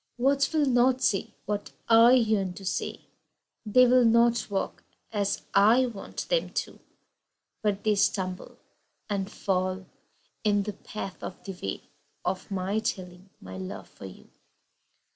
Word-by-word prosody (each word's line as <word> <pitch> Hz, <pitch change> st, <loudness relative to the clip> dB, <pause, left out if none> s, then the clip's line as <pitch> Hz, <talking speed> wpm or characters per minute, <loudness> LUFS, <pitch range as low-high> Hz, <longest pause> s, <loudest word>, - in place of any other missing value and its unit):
Words 275 Hz, +3 st, +2 dB
will 310 Hz, -2 st, +2 dB
not 255 Hz, 0 st, +3 dB
say 195 Hz, -, 0 dB
what 205 Hz, 0 st, -3 dB
I 230 Hz, +2 st, +7 dB
yearn 215 Hz, -7 st, +2 dB
to 195 Hz, -, -10 dB
say -, -, -3 dB, 0.7 s
They 250 Hz, +4 st, +6 dB
will 250 Hz, 0 st, +5 dB
not 235 Hz, 0 st, +3 dB
walk 195 Hz, -1 st, -3 dB, 0.3 s
as 205 Hz, -2 st, -1 dB
I 220 Hz, +6 st, +5 dB
want 225 Hz, -5 st, -6 dB
them -, -, +1 dB, 0.2 s
to, -, -, -16 dB, 0.8 s
But 205 Hz, -2 st, -1 dB
they 215 Hz, -, +3 dB
stumble 190 Hz, -2 st, -1 dB, 0.5 s
and 200 Hz, 0 st, -2 dB
fall 185 Hz, 0 st, -1 dB, 0.6 s
in 205 Hz, -2 st, +2 dB
the 210 Hz, +1 st, -4 dB
path 195 Hz, -1 st, -7 dB
of 180 Hz, -, -8 dB
the 195 Hz, -, -6 dB
way 95 Hz, -, -4 dB, 0.4 s
Of 185 Hz, -, -2 dB
my 195 Hz, +2 st, -1 dB
telling 185 Hz, -3 st, -5 dB
my 95 Hz, 0 st, -9 dB
love 95 Hz, 0 st, -7 dB
for -, -, -12 dB
you. 95 Hz, -, -15 dB
205 Hz, 145 wpm, -27 LUFS, 190-235 Hz, 0.8 s, I